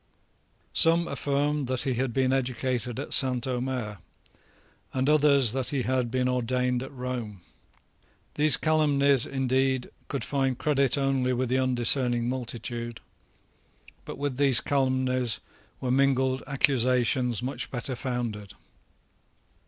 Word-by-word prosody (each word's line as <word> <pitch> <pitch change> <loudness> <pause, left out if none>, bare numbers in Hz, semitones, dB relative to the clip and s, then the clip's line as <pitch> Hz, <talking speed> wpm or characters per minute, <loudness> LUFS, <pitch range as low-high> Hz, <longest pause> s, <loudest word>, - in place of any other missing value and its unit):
Some 170 +1 +4
affirmed 145 0 -1
that 130 -1 -1
he 130 - -1
had 125 +1 -2
been 130 +2 0
educated 125 -1 -2
at 140 - -4
St. 130 -2 +2
Omers, 125 -4 -3 1.0
and 130 +1 0
others 145 -5 +4
that 130 0 -2
he 135 -3 -1
had 130 -1 -1
been 125 +1 -1
ordained 125 0 -1
at 130 - -8
Rome. 125 -7 -6 0.9
These 150 0 +6
calumnies, 140 -4 +3
indeed, 130 -1 -1 0.2
could 140 -5 -4
find 135 0 -1
credit 140 -1 +1
only 135 -2 0
with 125 0 -2
the 130 +1 +1
undiscerning 125 -1 +2
multitude; 120 -2 -5 1.0
but - - -8
with 140 -2 -3
these 135 -3 +6
calumnies 130 -5 0 0.4
were 125 - -2
mingled 130 0 +1
accusations 125 -3 +1
much 130 +2 -5
better 125 +1 -4
founded. 120 -6 -5
130 Hz, 120 wpm, -26 LUFS, 125-135 Hz, 1.0 s, These